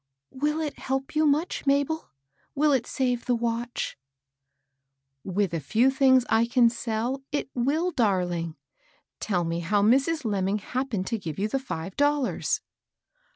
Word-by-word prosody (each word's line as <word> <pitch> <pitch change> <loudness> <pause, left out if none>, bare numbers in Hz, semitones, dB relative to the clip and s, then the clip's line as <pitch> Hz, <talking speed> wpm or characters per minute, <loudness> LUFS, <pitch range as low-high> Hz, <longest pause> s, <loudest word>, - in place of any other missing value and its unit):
" - - -62
Will 300 +4 -1
it 300 -2 -4
help 270 +2 -3
you 310 0 +4
much, 295 +1 0
Mabel? 285 +3 +1 0.5
Will 300 +1 +3
it 250 -3 +1
save 250 -2 -1
the 245 - +3
watch? 235 - -3 0.6
" 135 0 -54
With 195 -1 -1
a 165 - 0
few 230 - +2
things 260 -2 +4
I 225 +2 +3
can 235 -1 +4
sell, 235 +3 -2
it 290 -2 -3
wiU, 305 +9 0
darling. 175 -7 0 0.6
Tell 180 -5 0
me 165 0 -2
how 200 +4 +1
Mrs. 275 +7 +3
Lemming 200 -1 0
happened 245 -2 -3
to 225 +3 -2
give 160 -5 -6
you 205 - 0
the 270 +5 -1
five 190 -8 -6
dollars." 290 -2 +1
235 Hz, 155 wpm, -26 LUFS, 190-275 Hz, 0.6 s, you